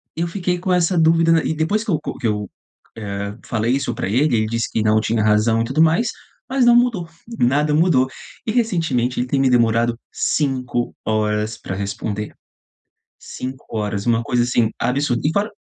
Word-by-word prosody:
eu 170 +1 -1
fiquei 180 0 -2
com 180 +1 -1
essa 180 0 +2
dúvida 165 0 +4
n 160 -1 +2
e - - 0
depois 205 +8 0
que 220 - -3
eu 155 - +1
co - - -6
que 125 - -7
eu, 105 -2 -2 0.5
eh, 100 -1 -5
falei 115 +2 0
isso 135 -3 -1
pra - - -3
ele, 125 +2 +2
ele 110 - +1
disse 115 +1 -1
que, 110 - 0
não, 110 0 +3
tinha 110 0 0
razão 110 +2 +3
e - - 0
tudo 135 +6 +2
mais, 170 +9 +2 0.4
mas 260 -2 +2
não 240 - +6
mudou, 240 -8 +2 0.3
nada 145 +5 +2
mudou, 155 -6 +3 0.4
e - - +1
recentemente 165 - 0
ele 125 - -1
tem 135 +1 0
me 135 - +3
demorado 115 -1 +2
5h 115 -5 -1
pra 95 - -5
responder, 100 +1 -4 0.9
5h, 110 -5 -5
uma 115 -1 +2
coisa 120 +1 +1
assim 120 -2 +1
absurda 125 -1 0
e - - -1
fora 200 +5 0
125 Hz, 185 wpm, -20 LUFS, 110-165 Hz, 0.9 s, não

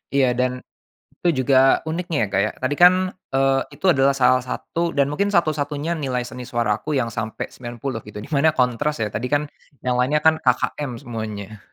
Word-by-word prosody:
Iya 135 -2 +4
dan 125 0 +1 0.7
itu 160 -7 +1
juga 135 0 +4
uniknya 165 +1 -3
ya - - -2
Kak 95 - +1
ya, - - -2
tadi 140 +3 0
kan, 185 +1 +5 0.2
eee, 135 0 +3
itu 190 - -4
adalah 140 -3 +3
salah 130 -1 +4
satu 165 +6 -3
dan 140 0 +2
mungkin 200 +7 -1
satu-satunya 155 0 0
nilai 130 -4 -1
seni 125 0 -8
suara 115 -3 0
aku 155 +6 -4
yang 120 -4 0
sampai 110 0 -4
90 120 0 -6
gitu, 105 0 -8
di 110 - -12
mana 155 +2 +3
kontras 130 +2 0
ya, 105 - -1
tadi 110 +5 -3
kan 145 +3 +1 0.4
yang 125 -1 0
lainnya 145 +4 +2
kan 160 0 +4
KKM 130 +1 0
semuanya. 110 -3 -6
135 Hz, 190 wpm, -22 LUFS, 120-150 Hz, 0.7 s, kan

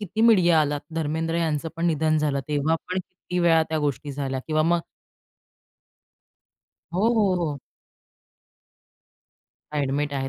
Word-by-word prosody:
किती 210 +2 -4
मीडिया 180 -8 +5
आला 145 -1 0 0.2
धर्मेंद्र 160 +1 -1
यांचं 165 -2 -1
पण 165 +1 0
निधन 155 -1 +2
झालं, 145 -2 0
तेव्हा 150 +2 +1
पण 185 +1 -1
किती 180 0 -6
वेळा 165 -2 +4
त्या 160 0 -1
गोष्टी 145 0 -2
झाल्या 135 -1 -3
किंवा 155 -1 +1
मग 170 +2 +2 2.1
हो, 200 +5 +3
हो, 205 -4 +3
हो. 155 -5 -2 2.2
ॲडमिट 145 0 -1
आहे. 135 -1 -2
160 Hz, 130 wpm, -24 LUFS, 145-175 Hz, 2.2 s, मीडिया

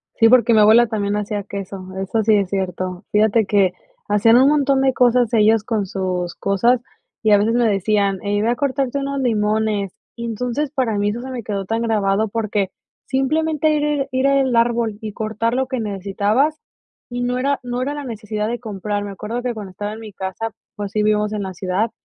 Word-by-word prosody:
Sí, 225 - +5
porque 240 -1 +5
mi 220 - +5
abuela 220 +3 +6
también 205 -2 -1
hacía 205 -1 -2
queso, 195 -1 -6 0.2
eso 195 +4 -1
sí 215 0 +4
es 200 -3 +1
cierto. 185 -1 -3
Fíjate 215 +1 +3
que 195 -2 +3 0.4
hacían 210 +3 +5
un 265 +3 +6
montón 280 -2 +2
de 265 -1 +3
cosas 245 -2 +3
ellos 220 -1 +4
con 215 -3 -1
sus 185 -2 -3
cosas 235 +5 +2 0.4
y 215 - +3
a 205 - +7
veces 215 +3 +1
me 240 -1 +3
decían: 200 -1 +1
"Ey, 205 0 0
ve 225 - +1
a 240 - +2
cortarte 275 0 -1
unos 275 0 -2
limones". 215 -4 0 0.2
Y 235 - -5
entonces, 250 +5 -2
para 250 -7 0
mí 205 0 +1
eso 235 +3 -5
se 260 +1 -7
me 250 - -4
quedó 200 -2 -3
tan 225 +4 -1
grabado 215 -1 +1
porque 210 -2 -1 0.4
simplemente 305 +3 +1
ir 295 -1 0
ir 295 -2 0
ir 260 +1 +1
al 270 -3 +2
árbol 230 -2 +1
y 215 -2 -6
cortar 220 +2 -2
lo 260 +1 0
que 260 -1 -3
necesitabas, 210 +8 0 0.5
y 245 0 -4
no 245 +1 0
era 280 +2 0
no 245 0 -3
era 285 +3 -2
la 290 - -5
necesidad 215 -3 -4
de 240 - -3
comprar. 205 -2 -4
Me 200 - -6
acuerdo 215 +5 -5
que 245 0 -2
cuando 205 -4 -8
estaba 205 +3 -5
en 220 - -8
mi 215 -2 -9
casa, 190 +3 -4 0.2
pues 205 -1 -5
sí 215 -1 0
vivimos 210 0 +1
en 205 -2 -2
la 190 - -5
ciudad, 185 +5 -1
220 Hz, 210 wpm, -20 LUFS, 205-245 Hz, 0.5 s, a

